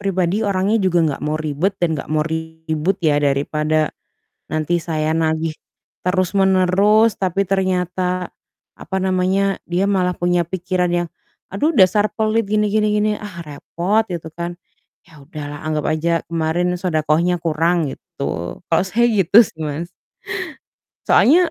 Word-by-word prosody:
pribadi 190 0 0
orangnya 200 0 +1
juga 185 -3 +2
nggak 150 -3 -2
mau 155 +1 0
ribet 155 +5 -1
dan 175 - +1
nggak 150 - -4
mau 155 -1 +1
ribut 160 +2 -2
ya 145 -2 +3
daripada, 150 +2 0 0.6
nanti 155 +2 0
saya 155 -1 -1
nagih, 160 0 0 0.5
terus-menerus 190 +3 +3
tapi 195 +1 +1
ternyata, 185 -1 -1 0.5
apa 190 - -4
namanya, 190 +1 +1
dia 175 +2 +1
malah 185 -3 +1
punya 175 -1 +1
pikiran 180 0 -1
yang 175 -1 -1 0.4
"Aduh 290 +9 0
dasar 205 +2 +5
pelit, 220 0 +1
gini 210 0 +2
gini 215 0 +2
gini" 210 0 +2
ah 205 -4 -8
repot, 175 +8 -1
gitu 170 -3 -5
kan. 170 +1 -4 0.5
Ya - - -22
udahlah 145 -1 -7
anggap 155 -1 -1
aja 155 +2 -1 0.2
kemarin 165 +2 0
shadaqah-nya 165 0 +1
kurang 165 +2 +1 0.2
gitu, - - -9 0.4
kalau 165 +2 +2
saya 215 +5 +1
gitu 190 +1 +3
sih, 160 - -12
Mas. 155 +3 -4 1.2
Soalnya 335 +6 +5
180 Hz, 135 wpm, -19 LUFS, 160-195 Hz, 1.2 s, dasar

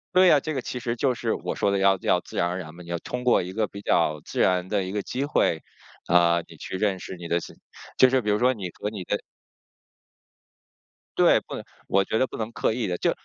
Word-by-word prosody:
对 185 0 +7
呀， 150 -4 +6
这 155 +3 -4
个 130 - -2
其 125 - -5
实 120 0 -2
就 125 +1 +1
是 - - -1
我 - - -4
说 100 - +1
的 100 - +1
要 95 0 +4
要 - - +3
自 - - -10
然 85 - +2
而 90 +1 -3
然 80 -3 -8
嘛。 90 - -11
你 85 - -13
要 85 - -1
通 125 0 -5
过 125 - +4
一 90 - -6
个 110 +1 0
比 100 - -9
较 75 -5 +1
自 - - -6
然 90 0 +2
的 100 -2 +1
一 95 - -5
个 105 +1 -1
机 130 +7 -3
会， 85 - +1 0.4
啊， 85 -1 +4
你 - - -15
去 - - -7
认 95 -2 0
识 - - -7
你 85 -1 -8
的 85 +1 +1
新 - - -10 0.4
就 130 0 +6
是 130 - +3
比 105 - -2
如 105 - +3
说 125 +3 +3
你 100 -6 -5
和 105 - -2
你 100 -4 -6
的 105 - 0 2.0
对， - - +6
不 - - -8
能 - - -6 0.2
我 100 0 +3
觉 110 - -1
得 130 - +3
不 - - -8
能 110 0 -3
刻 110 - 0
意 115 -4 -2
地。 90 - -2
就， - - +1
100 Hz, 280 characters per minute, -25 LUFS, 90-120 Hz, 2.0 s, 对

